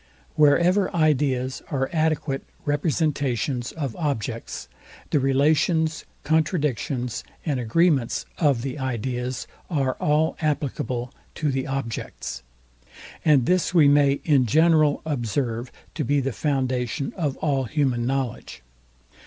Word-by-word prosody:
Wherever 170 +6 +4
ideas 135 -5 +1
are 135 -2 0
adequate 155 -3 0 0.2
representations 145 -4 0
of 140 -7 -4
objects, 115 - -3 0.4
the 150 - +3
relations, 155 +4 +2 0.2
contradictions 145 - 0 0.2
and 145 -6 0
agreements 135 +1 +2
of 140 -7 +2
the 135 +1 -4
ideas 125 0 -3 0.2
are 135 -6 +1
all 150 +2 +1
applicable 130 -5 -2 0.2
to 150 -2 0
the 135 0 -2
objects; 125 - -4 0.8
and 145 -6 +4
this 180 +2 +1
we 155 -4 +7
may 140 -1 +5
in 140 -6 +4
general 155 +2 +4
observe 120 -3 -2 0.2
to 150 - -2
be 145 +3 +2
the 135 -1 -2
foundation 130 -1 -1
of 150 -6 -2
all 140 -4 0
human 125 -3 0
knowledge. 130 - -3
140 Hz, 110 wpm, -24 LUFS, 125-155 Hz, 0.8 s, we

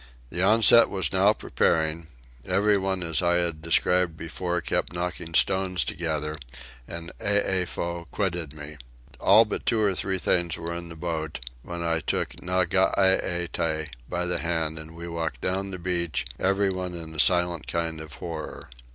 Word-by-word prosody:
The 85 +5 -2
onset 110 +3 +7
was 95 -1 -1
now 95 +2 +5
preparing; 80 -4 0 0.4
everyone 95 -2 +1
as 80 0 +1
I 85 0 +3
have 85 -3 0
described 85 +1 +2
before 85 +2 -2
kept 85 - -2
knocking 85 -1 -4
stones 95 -3 +2
together, 75 -2 -3 0.5
and 85 0 -7
Eefow 90 -4 -1
quitted 90 -7 -2
me. 75 0 -9 0.4
All 110 +4 +6
but 105 - -4
two 115 - +3
or 105 -3 +3
three 95 +1 -1
things 85 -2 +1
were 85 0 -4
in 85 0 -6
the 85 - -9
boat, 80 -2 -3 0.2
when 85 +5 -5
I 85 -1 +1
took - - -1
Nageete 90 -3 +1 0.2
by 90 0 -1
the 90 - -1
hand, 80 -2 -1
and 80 +1 -10
we 85 +1 -7
walked 80 -7 -3
down 95 +2 -1
the 95 - -5
beach, 85 -2 -1
everyone 95 -2 0
in 80 -2 -6
a 80 - -7
silent 85 -2 +2
kind 80 -1 -2
of 80 -2 -10
horror. 85 -6 -7
85 Hz, 155 wpm, -26 LUFS, 80-95 Hz, 0.5 s, onset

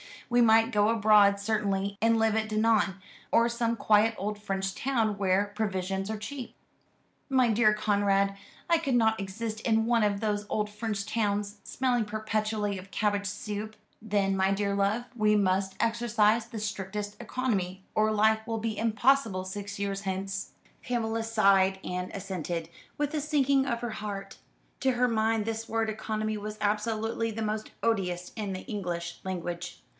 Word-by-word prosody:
We 240 0 +5
might 225 0 +5
go 210 -2 +3
abroad 210 -2 +5
certainly, 200 -2 -1
and 225 0 +4
live 225 -1 +2
at 220 0 0
Dinan, 215 -3 +2 0.4
or 230 - +5
some 235 0 0
quiet 220 0 +3
old 210 +1 -3
French 195 -1 -2
town 225 -5 0
where 200 +1 +1
provisions 195 -2 -2
are 220 - -2
cheap." 245 +4 -7 0.7
"My 260 -3 +4
dear 215 -1 +4
Conrad, 200 -2 +2 0.3
I 335 - +5
could 275 -6 0
not 220 -2 +3
exist 215 +3 -4
in 225 -1 +2
one 235 -1 +3
of 205 -1 +1
those 210 -1 -1
old 210 -1 0
French 210 -1 -3
towns, 210 -1 -1
smelling 245 -3 0
perpetually 215 -1 -1
of 190 +1 -12
cabbage 205 -1 0
soup." 210 +1 -5 0.3
"Then, 200 -2 +1
my 190 0 +2
dear 200 0 0
love, 200 +4 +1
we 210 -1 +4
must 190 -1 +1
exercise 230 -1 +2
the 230 -2 -6
strictest 205 0 -4
economy, 200 -7 -2
or 215 0 +3
life 220 +1 +2
will 225 -1 -1
be 220 -1 -3
impossible 225 -2 +2
six 200 +1 -6
years 200 -1 -2
hence." 195 0 -4 0.3
Pamela 225 -2 -1
sighed 195 -4 +3
and 180 0 -3
assented, 175 -4 -4 0.3
with 295 0 -1
a 305 - 0
sinking 280 -2 +2
of 235 -2 -1
her 240 -2 -3
heart. 200 -2 -6 0.4
To 265 - +2
her 245 0 +2
mind 220 -1 +1
this 225 0 -3
word 225 -1 0
economy 215 0 -2
was 210 +1 -6
absolutely 220 +2 0
the 220 +1 -4
most 215 0 -3
odious 180 -6 0
in 205 -3 -3
the 185 - -5
English 175 -6 -4
language. 175 -1 -5
215 Hz, 160 wpm, -29 LUFS, 200-225 Hz, 0.7 s, We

